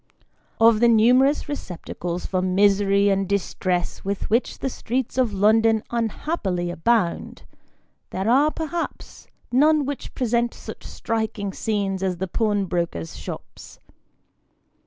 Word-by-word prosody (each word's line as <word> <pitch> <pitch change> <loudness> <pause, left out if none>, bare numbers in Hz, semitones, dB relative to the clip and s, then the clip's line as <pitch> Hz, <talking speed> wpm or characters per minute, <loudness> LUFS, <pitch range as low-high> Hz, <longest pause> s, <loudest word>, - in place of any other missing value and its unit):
OP 225 -1 +6
the 235 - +5
numerous 250 +7 +4
receptacles 180 - -5
for 185 -1 -1
misery 200 +1 +3
and 195 -1 0
distress 185 -2 -1
with 200 +1 -3
which 235 +3 +1
the - - -3
streets 255 -1 -3
of 250 -4 +2
London 220 +2 +3
unhappily 220 - -2
abound, 180 +1 0 0.7
there 190 +2 -3
are, 275 +6 +4
perhaps, 325 +2 -5 0.2
none 295 +3 +4
which 285 0 -6
present 235 -1 0
such - - -10
striking 220 -3 -3
scenes 200 -3 -2
as 185 -2 -1
the 190 +2 -3
pawnbrokers' 180 - -1
shops. - - -9
215 Hz, 115 wpm, -23 LUFS, 190-240 Hz, 0.7 s, OP